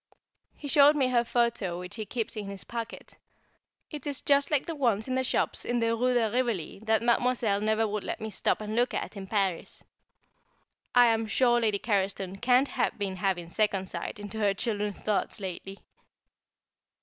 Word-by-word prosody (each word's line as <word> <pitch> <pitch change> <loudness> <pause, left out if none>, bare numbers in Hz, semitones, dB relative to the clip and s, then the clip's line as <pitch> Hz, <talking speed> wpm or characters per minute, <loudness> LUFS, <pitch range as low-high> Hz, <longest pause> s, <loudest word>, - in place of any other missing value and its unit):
He 290 - -8
showed 290 +1 +6
me 265 -3 +2
her 240 -2 +3
photo, 235 -7 0
which 180 0 -7
he 215 -2 -5
keeps 230 -2 -3
in 210 -2 -5
his 200 -1 -7
pocket. 230 -1 -7 0.7
It 295 -2 -7
is 285 -2 -3
just 280 0 +3
like 295 -3 +1
the 335 - -4
ones 235 -7 0
in 260 - -2
the 260 0 +1
shops 255 - 0
in 240 - -1
the 230 -1 +1
Rue 250 +2 +1
de 230 -2 +3
Rivoli 235 -8 -1
that 220 0 +2
Mademoiselle 235 -3 +2
never 220 +1 +1
would 210 -1 -3
let - - -4
me 220 0 -5
stop 205 - 0
and 215 +1 -4
look 245 +2 +1
at - - -4
in 195 -1 -7
Paris. 195 -4 -2 1.1
I 245 0 +8
am 225 -1 +2
sure 240 +1 +3
Lady 215 -3 +2
Carriston 195 -2 -2
can't 250 +2 +4
have - - -1
been 195 -2 -3
having 180 -3 -1
second 195 -3 0
sight - - -5
into 205 +1 -6
her 200 -2 +2
children's 210 -3 -2
thoughts 215 0 -1
lately! 195 0 -6
220 Hz, 185 wpm, -28 LUFS, 200-245 Hz, 1.1 s, I